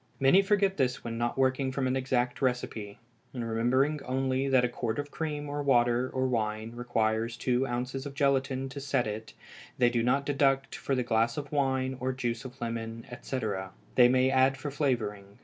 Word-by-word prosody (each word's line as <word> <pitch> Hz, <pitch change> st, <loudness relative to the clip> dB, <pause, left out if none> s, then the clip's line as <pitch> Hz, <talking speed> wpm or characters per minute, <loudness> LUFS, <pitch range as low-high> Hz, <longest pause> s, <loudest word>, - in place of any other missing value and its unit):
Many 135 Hz, +8 st, +6 dB
forget 195 Hz, -1 st, +2 dB
this 130 Hz, -3 st, 0 dB
when 115 Hz, -1 st, -4 dB
not 120 Hz, +1 st, -1 dB
working 130 Hz, 0 st, +1 dB
from 135 Hz, 0 st, -1 dB
an 130 Hz, 0 st, +1 dB
exact 125 Hz, -1 st, 0 dB
recipe, 120 Hz, -5 st, -2 dB, 0.4 s
and 120 Hz, -2 st, -3 dB
remembering 130 Hz, +6 st, +1 dB
only 130 Hz, +1 st, 0 dB
that 130 Hz, -2 st, +4 dB
a -, -, +2 dB
quart 115 Hz, -2 st, -3 dB
of 145 Hz, 0 st, -4 dB
cream 150 Hz, -2 st, -3 dB
or 145 Hz, 0 st, -3 dB
water 120 Hz, -2 st, +3 dB
or 130 Hz, 0 st, 0 dB
wine 110 Hz, -2 st, -1 dB
requires 115 Hz, -1 st, 0 dB
two 125 Hz, +1 st, +1 dB
ounces 125 Hz, +3 st, -3 dB
of 140 Hz, -, -9 dB
gelatine 135 Hz, -1 st, +1 dB
to 140 Hz, -, -7 dB
set 135 Hz, -2 st, 0 dB
it, 110 Hz, +1 st, -5 dB, 0.4 s
they 120 Hz, -1 st, +4 dB
do 120 Hz, -1 st, +1 dB
not 135 Hz, +4 st, +1 dB
deduct 135 Hz, -1 st, +1 dB
for 135 Hz, -, -2 dB
the 125 Hz, -, 0 dB
glass 115 Hz, +1 st, +1 dB
of 145 Hz, -1 st, -5 dB
wine 130 Hz, -2 st, 0 dB
or 130 Hz, +1 st, -1 dB
juice 120 Hz, -1 st, -3 dB
of 130 Hz, +1 st, -9 dB
lemon, 115 Hz, -1 st, -4 dB
etc., 110 Hz, -7 st, -4 dB, 0.2 s
they 125 Hz, -1 st, +7 dB
may 130 Hz, +1 st, +3 dB
add 135 Hz, +1 st, +3 dB
for 145 Hz, +3 st, -5 dB
flavoring. 105 Hz, -8 st, -2 dB
130 Hz, 190 wpm, -29 LUFS, 120-135 Hz, 0.4 s, they